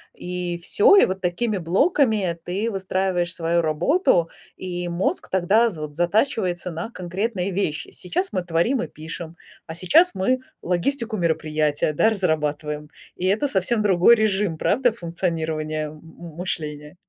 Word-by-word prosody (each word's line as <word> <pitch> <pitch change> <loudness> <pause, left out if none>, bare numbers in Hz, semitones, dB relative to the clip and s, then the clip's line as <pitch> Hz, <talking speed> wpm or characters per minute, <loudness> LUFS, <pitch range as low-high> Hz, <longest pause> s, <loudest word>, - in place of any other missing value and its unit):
и 180 -1 -4
всё. 410 - +4
И - - +7
вот 190 +1 -3
такими 195 +4 -1
блоками 195 - +1
ты 205 +6 -2
выстраиваешь 185 -2 -1
свою 170 +1 +1
работу. 170 - +2 0.3
И 180 -1 -5
мозг 170 +2 -1
тогда 200 +6 +3
з 175 -8 -9
вот 150 0 -7
затачивается 180 -1 0
на 165 +7 -5
конкретные 190 0 -3
вещи. 175 -5 -2
Сейчас 365 - -3
мы 185 -3 -1
творим 180 +10 +1
и - - -3
пишем, 160 +1 -7 0.3
а 160 - -7
сейчас 270 - +4
мы 225 +8 +1 0.2
логистику 220 +6 -1
мероприятия, 155 -3 0
да, 185 +9 +3
разрабатываем. 150 -5 -2 0.3
И 180 - -3
это 215 +9 +2
совсем 215 +3 +1
другой 195 +3 +5
режим, 205 -6 0
правда, 245 +7 +2
функционирования 160 -5 -2
м 150 - -10
м 165 0 -12
мышления? 150 -3 -4
180 Hz, 145 wpm, -23 LUFS, 165-210 Hz, 0.3 s, И